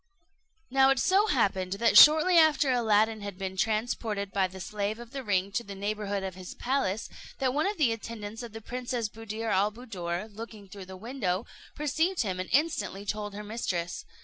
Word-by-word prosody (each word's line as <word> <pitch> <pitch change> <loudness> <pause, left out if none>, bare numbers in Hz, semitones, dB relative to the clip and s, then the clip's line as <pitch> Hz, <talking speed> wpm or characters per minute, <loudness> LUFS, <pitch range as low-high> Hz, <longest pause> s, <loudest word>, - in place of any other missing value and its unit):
Now 270 0 +5
it 270 - +3
so 390 - +3
happened 195 - +1
that 230 +3 +2
shortly 315 +4 +8
after 305 -4 +5
Aladdin 220 -2 +2
had 200 -2 -6
been 190 -1 -4
transported 215 -1 -1
by 190 -1 +1
the 190 +1 -11
slave 205 +3 -3
of 240 0 -11
the 270 -1 -5
ring 200 -3 0
to 235 +4 -1
the 200 -2 -8
neighbourhood 205 0 -2
of 190 -1 -4
his 185 0 -9
palace, 235 -5 -1 0.3
that 260 -2 0
one 305 +6 +1
of 410 0 -2
the 280 -7 +3
attendants 225 -1 -6
of 235 -2 -8
the 225 +1 -8
Princess 245 0 -3
Buddir 225 +1 -5
al 200 +3 +2
Buddoor, 205 -5 -5
looking 220 -2 -9
through 195 0 -10
the 190 0 -10
window, 215 -3 -2 0.3
perceived 320 +3 0
him 185 -3 -3
and 185 - -4
instantly 290 -9 0
told 205 0 -4
her 210 - -6
mistress. 185 -5 -3
215 Hz, 190 wpm, -28 LUFS, 195-250 Hz, 0.3 s, shortly